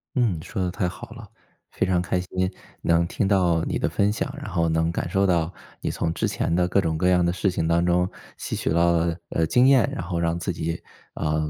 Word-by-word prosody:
嗯， 110 - +1
说 95 - -4
得 90 - 0
太 90 +1 -1
好 - - -10
了。 - - -11 0.4
非 - - -1
常 90 -1 +2
开 90 +1 -1
心 90 +1 -2 0.3
能 85 0 +2
听 100 - -1
到 90 -5 +3
你 - - -2
的 - - +1
分 100 +1 +1
享， 105 - -3
然 - - -7
后 85 -1 +1
能 80 0 +1
感 85 - -3
受 95 +2 +2
到 85 -2 +1 0.3
你 - - -2
从 80 -1 -1
之 - - -1
前 - - -1
的 90 +1 +2
各 100 +2 +2
种 80 -3 -1
各 90 - +1
样 90 -1 +4
的 85 - +2
事 90 +2 0
情 90 -3 -1
当 85 +1 +2
中， 90 +1 +2 0.3
吸 - - -6
取 - - -1
到 85 +1 +3
了， 85 0 +1
呃， 80 -1 0
经 125 +9 +4
验， 135 -6 +5
然 85 - -4
后 85 0 -2
让 85 0 0
自 85 - -2
己， 85 0 -4 0.3
呃， 75 0 -1
85 Hz, 260 characters per minute, -24 LUFS, 85-90 Hz, 0.4 s, 验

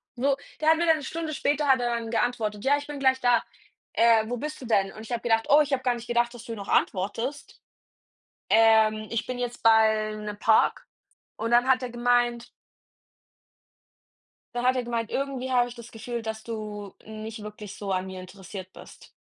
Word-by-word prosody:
So, 270 +2 +1 0.2
der 310 - +3
hat 320 - +5
mir 340 - +1
dann 325 -1 +4
'ne 295 - -8
Stunde 315 +2 -4
später 290 0 0
hat 265 -1 +5
er 240 -1 0
dann 230 -1 -4
geantwortet: 220 -2 -1
„Ja, 285 +2 +3
ich 290 0 -7
bin 290 -1 -6
gleich 260 -1 +3
da. 245 -2 +3 0.5
Äh, 225 -1 +4
wo 245 - -2
bist 300 +3 -6
du - - -7
denn?“ 195 -4 +1
Und 215 - -10
ich 225 - -11
habe 235 -1 -1
gedacht: 225 -1 +1
„Oh, 295 +1 +7
ich 290 -1 -1
habe 260 -1 0
gar 250 -1 +1
nicht 240 0 -9
gedacht, 240 0 +1
dass 240 0 -11
du 230 - -5
noch 200 -2 -8
antwortest. 230 +9 -1 0.9
Ähm, 220 -1 +4
ich 230 0 -1
bin 255 -1 -4
jetzt 245 -1 -4
bei 220 -1 +4
'nem 210 -1 -6
Park.“ 220 0 +3 0.5
Und 225 +2 -3
dann 240 +1 +4
hat 260 -1 +3
er 250 - -3
gemeint 240 0 +1 2.1
dann 245 0 -2
hat 255 +1 +4
er 255 - -1
gemeint: 230 -2 -3
„Irgendwie 265 -1 -3
habe 245 -1 +3
ich 245 - -10
das 235 -1 -11
Gefühl, 235 +1 -5
dass 220 -1 -5
du 210 -3 -6
nicht 220 +1 -8
wirklich 210 -1 -9
so 200 -2 -5
an 185 0 0
mir 190 -1 -7
interessiert 190 0 -10
bist.“ - - -14
235 Hz, 205 wpm, -26 LUFS, 215-255 Hz, 2.1 s, Oh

